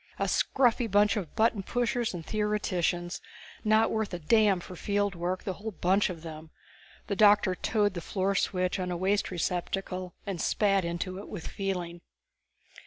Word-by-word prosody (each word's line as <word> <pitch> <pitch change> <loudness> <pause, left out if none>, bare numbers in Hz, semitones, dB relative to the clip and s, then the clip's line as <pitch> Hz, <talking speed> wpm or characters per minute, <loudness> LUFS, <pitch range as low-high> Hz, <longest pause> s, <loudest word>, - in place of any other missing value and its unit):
"A - - 0
scruffy 245 -3 +2
bunch 205 +2 +4
of 185 -8 -4
button 220 -2 +2
pushers 240 +2 -1
and 170 -3 -7
theoreticians. 185 -5 -1 0.4
Not 220 +1 +4
worth 220 -4 -1
a - - -3
damn 200 +3 +3
for 180 +1 -9
field 205 +2 0
work, 180 +1 -3
the 190 - -2
whole 215 +4 -6
bunch 190 +4 +2
of 170 -3 -7
them!" 160 -1 -8 0.6
The 200 - -2
doctor 205 -2 +5
toed 205 +1 +1
the 170 - -5
floor 190 +3 -1
switch 185 -1 0
on 180 -1 -2
a 175 - -2
waste 195 +3 +1
receptacle 180 +1 -3
and 190 -5 -3
spat 195 -2 +2
into 175 +2 -3
it 205 - -9
with 185 -6 -7
feeling. 180 -3 -4
195 Hz, 170 wpm, -29 LUFS, 175-210 Hz, 0.6 s, doctor